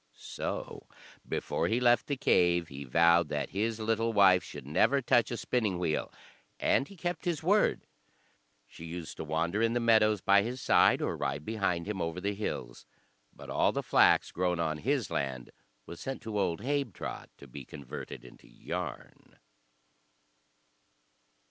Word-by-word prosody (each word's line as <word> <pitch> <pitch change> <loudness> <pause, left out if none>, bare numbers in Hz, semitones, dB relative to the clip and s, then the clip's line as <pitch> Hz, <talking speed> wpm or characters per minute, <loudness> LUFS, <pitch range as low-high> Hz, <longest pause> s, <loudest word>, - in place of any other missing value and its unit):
So - - -6 0.4
before - - -1
he 115 +2 +1
left 120 -1 +3
the 140 - -2
cave 85 -7 +2
he 70 0 -8
vowed 85 +4 +4
that 75 -2 -3
his 110 +4 -1
little 115 +1 0
wife 95 -3 +5
should - - -9
never 105 - +2
touch 120 -2 +2
a 120 - -3
spinning 110 -8 -1
wheel, 85 -3 -1 0.5
and 135 - +2
he 200 - -13
kept 175 +3 -4
his 170 -3 -1
word. 205 +5 +2 0.8
She 80 - -13
used 85 0 -7
to - - -4
wander 85 +6 -1
in 115 0 +2
the 120 - +1
meadows 110 -3 +4
by 100 +2 +4
his 120 +5 -4
side, - - +4
or - - -1
ride 70 +2 -3
behind 100 -5 -1
him 100 -3 -3
over 85 +1 -3
the 100 +2 -2
hills, 65 - -5 0.4
but - - -11
all - - +2
the - - -3
flax - - +4
grown 90 -1 -1
on 80 -2 -1
his 135 - -1
land 65 -3 -3 0.3
was 85 - -10
sent 135 0 -6
to 110 -2 -3
old 85 -2 -1
Habetrot 140 -4 -3
to - - -13
be 65 +2 -9
converted 65 -2 -9
into 60 - -16
yarn. - - -7
100 Hz, 160 wpm, -30 LUFS, 80-115 Hz, 0.8 s, wife